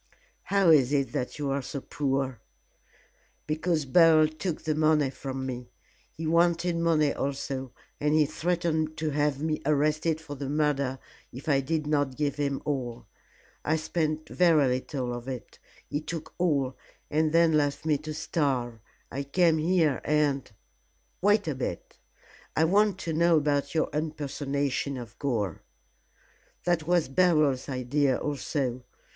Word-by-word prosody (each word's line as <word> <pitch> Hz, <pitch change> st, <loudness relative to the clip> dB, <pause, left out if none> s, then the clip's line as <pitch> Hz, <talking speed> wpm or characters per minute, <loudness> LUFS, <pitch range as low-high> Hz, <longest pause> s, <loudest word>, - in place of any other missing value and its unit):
"How 195 Hz, -4 st, +4 dB
is 140 Hz, -4 st, +5 dB
it 140 Hz, -2 st, +1 dB
that 125 Hz, -, -3 dB
you 145 Hz, -2 st, -2 dB
are 140 Hz, +1 st, 0 dB
so 140 Hz, +2 st, -5 dB
poor?" 135 Hz, -2 st, -2 dB, 1.1 s
"Because 155 Hz, 0 st, 0 dB
Beryl 155 Hz, +2 st, +6 dB
took 155 Hz, +2 st, -4 dB
the 155 Hz, -, 0 dB
money 155 Hz, -3 st, +3 dB
from 135 Hz, -1 st, -5 dB
me. 125 Hz, -2 st, -5 dB, 0.5 s
He 160 Hz, -, -4 dB
wanted 170 Hz, +1 st, +2 dB
money 160 Hz, -3 st, +2 dB
also, 135 Hz, -2 st, -3 dB, 0.3 s
and 150 Hz, +1 st, +2 dB
he 155 Hz, -1 st, +5 dB
threatened 160 Hz, 0 st, -1 dB
to 155 Hz, -1 st, -1 dB
have 145 Hz, 0 st, 0 dB
me 155 Hz, -1 st, -1 dB
arrested 155 Hz, +2 st, +1 dB
for 160 Hz, -2 st, -8 dB
the 140 Hz, -1 st, -5 dB
murder 140 Hz, -3 st, 0 dB, 0.3 s
if 130 Hz, +5 st, -10 dB
I 140 Hz, -3 st, +4 dB
did 155 Hz, +3 st, -1 dB
not 145 Hz, -3 st, 0 dB
give 145 Hz, -2 st, -1 dB
him 140 Hz, -2 st, -1 dB
all. 125 Hz, -5 st, -3 dB, 0.6 s
I 155 Hz, -, +1 dB
spent 155 Hz, -1 st, -2 dB
very 165 Hz, -6 st, +4 dB
little 125 Hz, 0 st, -2 dB
of 120 Hz, +1 st, -7 dB
it. 130 Hz, -3 st, -7 dB, 0.3 s
He 145 Hz, -, -2 dB
took 160 Hz, 0 st, -6 dB
all, 140 Hz, -7 st, +1 dB, 0.4 s
and 155 Hz, +1 st, +2 dB
then 165 Hz, 0 st, +4 dB
left 145 Hz, 0 st, +1 dB
me 150 Hz, -3 st, +2 dB
to 155 Hz, +1 st, -6 dB
starve. 130 Hz, -7 st, -1 dB, 0.3 s
I 140 Hz, -, -3 dB
came 160 Hz, +3 st, +2 dB
here, 160 Hz, -4 st, +2 dB
and 145 Hz, -4 st, +1 dB, 0.3 s
" -, -, -42 dB
"Wait 205 Hz, 0 st, +3 dB
a 155 Hz, -, 0 dB
bit; 125 Hz, -10 st, -5 dB, 0.6 s
I 160 Hz, -, +3 dB
want 200 Hz, +3 st, +3 dB
to 165 Hz, -, -3 dB
know 170 Hz, +1 st, +4 dB
about 145 Hz, 0 st, 0 dB
your 155 Hz, -, +2 dB
impersonation 140 Hz, -2 st, -2 dB
of 115 Hz, -3 st, -9 dB
Gore?" 110 Hz, -, -1 dB, 1.0 s
"That 170 Hz, -3 st, 0 dB
was 175 Hz, -2 st, +3 dB
Beryl's 150 Hz, -3 st, +2 dB
idea 130 Hz, +1 st, +1 dB
also. 135 Hz, -3 st, -2 dB
150 Hz, 150 wpm, -28 LUFS, 135-160 Hz, 1.1 s, Beryl